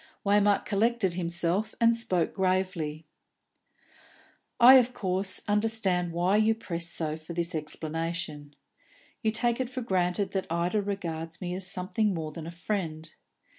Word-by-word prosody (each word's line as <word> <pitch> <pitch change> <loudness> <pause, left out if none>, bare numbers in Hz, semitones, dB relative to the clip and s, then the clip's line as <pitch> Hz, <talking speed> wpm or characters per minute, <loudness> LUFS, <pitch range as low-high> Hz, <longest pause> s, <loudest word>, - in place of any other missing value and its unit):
Waymark 205 0 +3
collected 215 -2 +1
himself, 175 +3 -1
and 230 0 +4
spoke 190 -8 -1
gravely. 185 -5 -1 1.5
"I, 255 +2 +10
of 250 0 0
course, 190 -1 -1
understand 205 -5 +1
why 175 +4 +2
you 220 +1 +3
press 170 -6 -1
so 155 -3 -2
for 160 +2 -9
this 170 +1 -2
explanation. 155 -1 -4 0.7
You 220 - +1
take 235 +2 0
it 255 -2 -2
for 255 0 -5
granted 185 -1 0
that 190 -1 -2
Ida 175 +5 0
regards 165 -5 -4
me 180 -1 -4
as 185 0 0
something 195 +3 0
more 155 -2 -4
than 160 +1 -8
a - - -6
friend. 165 -4 -4
185 Hz, 140 wpm, -28 LUFS, 170-210 Hz, 1.5 s, I